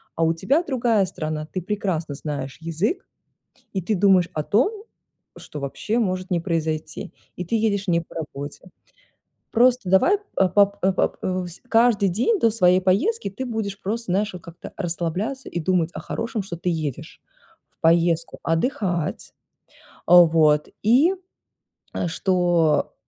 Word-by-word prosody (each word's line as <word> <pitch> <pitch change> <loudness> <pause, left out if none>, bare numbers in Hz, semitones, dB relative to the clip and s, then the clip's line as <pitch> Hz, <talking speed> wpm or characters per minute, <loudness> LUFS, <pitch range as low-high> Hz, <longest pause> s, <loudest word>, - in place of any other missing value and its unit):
а 165 - 0
у 165 - +3
тебя 275 - +1
другая 235 - +1
страна, 155 -3 -4
ты 185 - -3
прекрасно 175 -6 -2
знаешь 140 -2 -5
язык, 165 - -2 0.7
и 190 - -1
ты 215 - 0
думаешь 185 -2 +4
о 155 - -1
том, 405 - +1 0.5
что 150 - -9
вообще 210 - -2
может 185 -3 -2
не 175 - +2
произойти, 160 +1 -3 0.2
и 180 - -5
ты 175 - -7
едешь 205 -3 0
не 170 -1 +2
по 165 - -16
работе. 150 +2 -7 0.8
Просто 245 -3 +3
давай 345 - +4 0.2
по 190 - +4
пап 200 +1 +3
по 190 0 +2
пап 185 - 0 0.5
каждый 225 -3 +4
день 245 - +1
до 230 - +4
своей 185 -4 +4
поездки 305 - +1
ты 260 +7 -5
будешь 215 -4 -4
просто, 215 -1 -3
знаешь, 205 +1 0
как-то 170 0 -11
расслабляться 180 +8 -3
и - - -4
думать 175 -1 +1
о - - -5
хорошем, 230 -2 -3
что 185 -3 -7
ты 175 +2 -3
едешь 155 -6 -5 0.5
в - - -37
поездку 165 0 +2
отдыхать, 175 - -1 0.5
э, - - -23 0.2
вот, 160 -4 +6
и 265 - +4 0.9
что 175 -3 +1
185 Hz, 145 wpm, -23 LUFS, 165-220 Hz, 0.9 s, вот